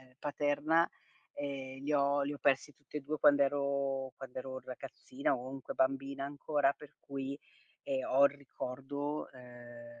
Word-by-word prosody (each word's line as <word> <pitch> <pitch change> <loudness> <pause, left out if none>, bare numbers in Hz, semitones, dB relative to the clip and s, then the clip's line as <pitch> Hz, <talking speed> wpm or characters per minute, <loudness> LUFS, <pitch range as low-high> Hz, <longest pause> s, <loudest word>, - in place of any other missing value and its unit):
ehm, 130 -1 -20
paterna, 150 +3 +2 0.5
ehm, 135 -2 -4
li 150 - 0
ho 140 0 +4
li 145 +1 -1
ho 145 - -6
persi 140 +2 +3
tutti 145 +1 -11
e - - 0
2 150 +2 -2
quando 145 -1 +7
ero 140 -1 +1
quando 130 -1 -7
ero 130 0 -4
ragazzina 130 +1 -2
o 130 +2 -6
comunque 135 -1 -6
bambina 135 +1 +1
ancora 145 0 +2
per 145 0 -14
cui, 140 0 -4 0.4
ehm, 135 -2 -1
ho 140 +2 +6
il 140 - +7
ricordo 140 +2 -4
ehm, 120 -2 -12
140 Hz, 160 wpm, -34 LUFS, 130-145 Hz, 0.5 s, quando